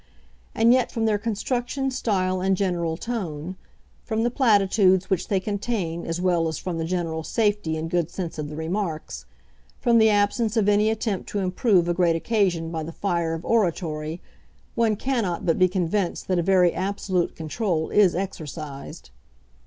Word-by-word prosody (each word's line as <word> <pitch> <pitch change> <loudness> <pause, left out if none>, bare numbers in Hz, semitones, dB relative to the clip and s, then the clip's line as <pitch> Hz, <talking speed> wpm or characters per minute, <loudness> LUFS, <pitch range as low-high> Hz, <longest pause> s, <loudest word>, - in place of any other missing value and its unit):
And 230 +2 +5
yet, 255 -1 +2
from 225 -1 -1
their 210 -2 +2
construction, 245 +5 -2
style, 185 -7 0
and 190 0 +2
general 175 -4 -1
tone, 180 -7 -4 0.5
from 225 -1 -1
the 240 - +1
platitudes 195 -6 +3
which 190 - 0
they 195 - +1
contain 200 -4 -3
as 165 +1 -2
well 175 -2 +2
as 160 -2 -3
from 175 -3 -4
the 165 - -1
general 165 -2 -2
safety 205 -6 0
and 160 +1 -3
good 170 -1 0
sense 170 -3 -5
of 150 -1 -4
the 150 - -7
remarks, 165 0 -4 0.5
from 235 -2 +4
the 220 0 +6
absence 210 +2 +1
of 210 -2 +2
any 210 +1 +4
attempt 220 -3 -2
to - - -3
improve 185 -1 +2
a 175 - +2
great 170 -2 +2
occasion 175 -4 0
by 160 -1 -3
the 160 +2 -6
fire 170 -3 -1
of 165 - -8
oratory, 165 -7 0 0.5
one 225 -2 +2
cannot 220 -7 -1
but 165 - +1
be 185 - +6
convinced 185 +1 -1
that 185 -2 +2
a - - +3
very 180 -1 +4
absolute 190 -2 -1
control 160 0 -2
is 195 -5 +4
exercised. 155 -6 -6
185 Hz, 170 wpm, -24 LUFS, 165-210 Hz, 0.5 s, the